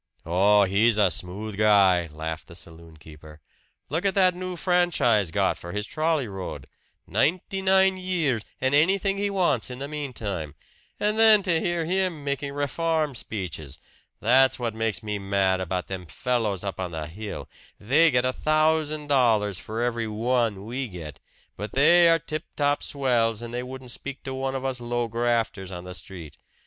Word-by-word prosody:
"Oh, 100 +5 +4
he's 105 +4 +3
a 100 -4 +4
smooth 100 +5 -4
guy!" 95 -5 +4
laughed 80 +1 -6
the 85 - -13
saloon 80 -1 -13
keeper. 75 0 -14 0.5
"Look 165 +6 -2
at 195 0 +1
that 185 -2 +4
new 185 0 -5
franchise 170 - +2
got - - 0
for 85 - -8
his 105 0 -2
trolley 155 -3 0
road 95 -3 -7 0.4
ninety 185 +4 0
nine 190 0 +4
years, 170 - -1 0.2
and 130 +1 0
anything 195 +6 +3
he 205 0 0
wants 170 - +1
in 125 - -7
the 140 +2 -5
meantime! 110 - -5 0.4
And 210 +1 0
then 220 -2 +7
to 175 -4 +2
hear 170 -1 -1
him 180 -3 -1
making 140 0 -3
reform 150 +1 -1
speeches! 85 - -5 0.4
That's 130 +3 +4
what 120 -3 -3
makes 110 -1 -2
me 105 -1 -3
mad 95 -1 +1
about 90 0 -2
them 95 -2 -7
fellows 110 - -1
up 100 -2 -5
on 95 -1 -2
the 80 -2 -5
hill. 100 +7 -7 0.3
They 150 +10 +4
get 125 -2 +2
a 130 - 0
thousand 155 0 +1
dollars 110 -9 +2
for 110 +2 -4
every 120 -2 -1
one 110 -2 0
we 125 +3 -3
get; 85 -7 -9 0.4
but 105 - -6
they 170 +5 +6
are 165 - +5
tip 155 0 -5
top 145 0 +1
swells, 120 -5 0
and 120 0 -7
they 120 - -2
wouldn't 130 0 -7
speak 140 +3 -6
to 135 - -5
one 135 0 -3
of 135 0 -4
us 130 -2 -2
low 120 0 -1
grafters 115 -4 -1
on 90 -2 -7
the 90 0 -8
street. 85 -5 -9
120 Hz, 175 wpm, -25 LUFS, 100-155 Hz, 0.5 s, then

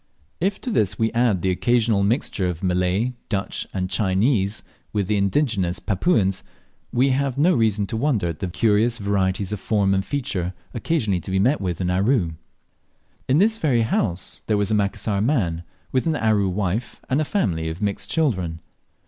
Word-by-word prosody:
If 190 +3 0
to 250 - -3
this 105 - +1
we 110 -1 +1
add 115 -7 +1
the 95 - +2
occasional 115 +1 +2
mixture 100 -3 0
of 90 +1 -4
Malay, 90 +6 +1 0.2
Dutch, 100 -3 -2
and 90 -1 -2
Chinese 100 +2 +1 0.3
with 105 -2 0
the 105 +3 0
indigenous 100 - +1
Papuans, 95 - +1 0.5
we 130 +3 +3
have 135 0 0
no 170 +6 +4
reason 110 -4 +2
to 110 - -5
wonder 115 - +1
at 80 - -6
the 95 - -2
curious 110 +5 +2
varieties 100 -2 0
of 105 - -3
form 100 -3 +1
and 95 0 +1
feature 95 -11 -3 0.2
occasionally 115 - 0
to 85 - -9
be 95 - 0
met 125 +9 +2
with 90 -4 -2
in 90 0 0
Aru. 95 -1 +2 1.0
In 130 - +3
this 220 +5 +3
very 125 -7 +2
house 95 -5 -2
there 105 - +2
was 100 0 0
a - - +3
Macassar 100 0 0
man, 100 - +1 0.3
with 130 +4 0
an 160 - +1
Aru 110 -6 +2
wife 100 +5 -2
and 135 +4 +1
a - - +2
family 85 - -1
of 80 +2 -6
mixed 100 -1 -2
children. 95 - 0
105 Hz, 180 wpm, -23 LUFS, 95-125 Hz, 1.0 s, no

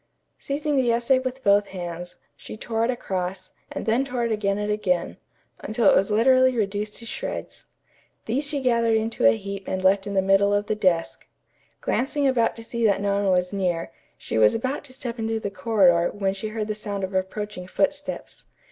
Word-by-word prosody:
Seizing 290 +1 -1
the 250 -3 +3
essay 240 +3 +3
with 260 0 -5
both 200 0 +4
hands, 175 -1 -7 0.2
she - - -10
tore 225 0 -2
it - - -2
across, 185 -6 -3 0.2
and - - -5
then 230 +4 +2
tore 250 -3 -2
it 230 - -1
again 200 -2 0
and 210 0 -1
again, 185 -5 -1 0.4
until 220 -1 0
it - - +7
was 195 - +2
literally 255 +3 +4
reduced 210 0 -2
to 230 - -7
shreds. - - -6 0.6
These 270 +6 0
she 285 -1 -1
gathered 235 -3 +2
into 220 - +1
a 110 0 +4
heap 200 - -7
and 185 0 -2
left 195 +1 +3
in 200 - -4
the 190 - +3
middle 195 +1 +4
of 205 0 0
the 215 - 0
desk. 185 -6 0 0.5
Glancing 280 +2 0
about 240 -4 +2
to 230 - -10
see 235 +1 -4
that 205 -3 +3
no 200 0 0
one 200 0 0
was 180 +1 +1
near, 175 -6 -1 0.3
she 110 - -2
was 105 -1 +5
about 260 +6 -2
to 260 - -12
step 245 -2 -5
into 225 0 -1
the 200 -2 -4
corridor 185 -4 +3
when 195 -2 -1
she 195 +2 -5
heard 215 0 -3
the - - 0
sound 205 -2 -5
of 190 +1 -3
approaching 190 0 -3
footsteps. 290 +7 -2
210 Hz, 200 wpm, -24 LUFS, 190-235 Hz, 0.6 s, it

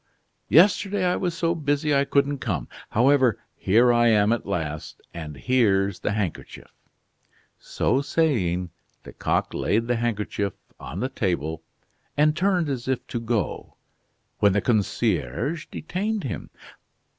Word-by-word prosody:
Yesterday 195 +3 +4
I 180 - +2
was 175 -3 -2
so 170 -2 +1
busy 145 -1 0
I 140 0 +3
couldn't 140 0 +1
come; 95 - -3 0.2
however, 130 -1 +3 0.2
here 120 +5 +4
I 120 0 +4
am 105 -1 +4
at 120 - -4
last, 80 -6 -4
and 75 -4 -7
here's 100 -7 +2
the - - -1
handkerchief." 100 -5 -5 0.9
So 135 - 0
saying, 95 - 0 0.3
Lecoq - - -2
laid 115 +2 0
the 120 0 0
handkerchief 105 -3 -2 0.3
on 90 - -6
the 130 - -1
table, 85 - -2 0.6
and 150 +1 +4
turned 180 -1 +1
as 130 -4 -4
if 130 -2 -1
to 120 - -2
go, 115 -4 -3 0.6
when 100 -2 +4
the 100 - +2
concierge 115 - 0
detained 205 +6 -3
him. 120 - -5
120 Hz, 135 wpm, -24 LUFS, 100-145 Hz, 0.9 s, Yesterday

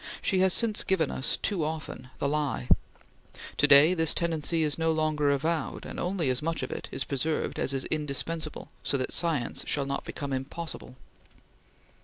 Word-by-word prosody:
She 190 - +1
has 190 0 +4
since 220 +2 +2
given 165 -6 +1
us 130 - -1
too 190 -7 0
often 155 -4 -5
the - - 0
lie. 145 -4 -1 0.9
To - - +5
day 145 +5 +8
this 165 -3 +2
tendency 165 -1 +1
is 150 +1 0
no 165 0 +2
longer 155 -2 +1
avowed, 155 +3 -1
and - - -6
only 175 -6 0
as 125 - -1
much 165 +2 -2
of - - -4
it - - -5
is - - -1
preserved 150 +3 -2
as - - +2
is 135 -1 -1
indispensable 155 +1 -3
so 140 - +1
that 130 - -2
science 160 -8 0
shall 140 -2 +1
not 140 0 -3
become 140 -1 -5
impossible." 135 +1 -5
155 Hz, 175 wpm, -28 LUFS, 140-165 Hz, 0.9 s, day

